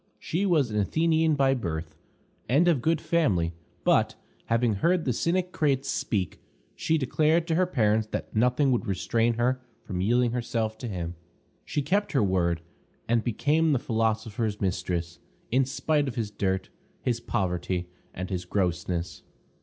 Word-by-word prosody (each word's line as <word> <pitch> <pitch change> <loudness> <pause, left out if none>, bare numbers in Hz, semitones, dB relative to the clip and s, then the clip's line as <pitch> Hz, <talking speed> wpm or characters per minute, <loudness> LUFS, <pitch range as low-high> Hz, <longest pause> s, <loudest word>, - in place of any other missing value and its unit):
She 190 +5 -1
was 150 - +2
an 105 - 0
Athenian 160 +7 +2
by 135 -1 +3
birth, 80 -9 -4 0.5
and 150 +8 +4
of 160 -8 +3
good 160 +3 +2
family, 95 - +1 0.3
but, - - +3 0.3
having 115 -1 +2
heard 170 - +1
the 125 - +1
Cynic 180 +7 0
Crates 140 -5 +1
speak, 95 -6 -2 0.3
she 160 - +1
declared 155 +4 +2
to 165 - +1
her 180 +2 +3
parents 110 -8 +2
that - - -5
nothing 125 +5 +3
would 120 -1 0
restrain 115 +4 +1
her 125 +2 +1 0.2
from 90 -3 -3
yielding 120 +4 +3
herself 115 -2 -1
to 125 - -5
him. 90 -5 -4 0.5
She 145 - -1
kept 205 +7 0
her 135 - +3
word, 85 -3 +1 0.5
and 115 -1 +2
became 150 +6 +2
the - - +3
philosopher's 110 -2 -1
mistress, 90 -3 -2 0.3
in 130 +2 +3
spite 145 +2 0
of 130 - -4
his 110 -3 -2
dirt, 95 -2 -1 0.3
his 120 -2 0
poverty, 90 -5 -1 0.2
and 95 +2 -6
his 90 -1 -2
grossness. 90 -2 -1
115 Hz, 155 wpm, -27 LUFS, 95-145 Hz, 0.5 s, and